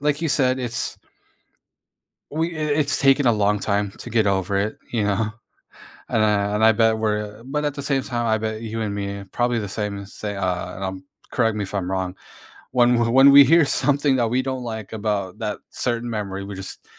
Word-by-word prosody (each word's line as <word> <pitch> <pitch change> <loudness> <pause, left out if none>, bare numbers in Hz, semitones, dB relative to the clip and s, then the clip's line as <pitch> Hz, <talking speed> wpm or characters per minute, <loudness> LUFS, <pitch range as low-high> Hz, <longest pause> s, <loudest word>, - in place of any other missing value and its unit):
like 145 +1 0
you 165 - 0
said, 130 -2 +2
it's 120 -2 -2 1.3
we 165 +2 -2
i 155 - -3
it's 150 -1 +2
taken 135 0 +4
a 120 - +5
long 105 -1 +1
time 100 0 -1
to - - -8
get 110 -2 +2
over 100 0 0
it, 100 +2 -1
you 115 - 0
know? 105 +1 0 0.8
And 110 - +1
I 105 -1 +1
and 110 - +1
I 110 - +7
bet 110 0 +3
we're 105 0 -2
but 150 +4 -2
at 145 - -1
the 140 - -6
same 135 -2 0
time, 120 -2 -2
I 110 0 +2
bet 110 0 -4
you 115 0 -4
and 105 -2 -2
me 100 0 -4
probably 120 0 0
the 105 - -4
same 105 0 -3
as 100 +1 -10
say 105 -1 -5
a 100 - -5 0.3
and 95 - -6
I'm 95 0 -5 0.3
correct 115 -3 +1
me 105 - -2
if 95 - -6
I'm 95 -3 -2
wrong, 95 -1 -2 0.6
when 125 -1 +4
w 120 -1 +1
when 135 +2 +7
we 140 0 +10
hear 165 +4 +5
something 140 0 +2
that 120 - +2
we 125 +3 +1
don't 130 -1 -4
like 110 -3 -6
about 100 -3 -3
that - - -3
certain 120 0 -2
memory, 100 -3 -4
we 100 0 -7
just 95 0 -7
110 Hz, 220 wpm, -22 LUFS, 100-130 Hz, 1.3 s, we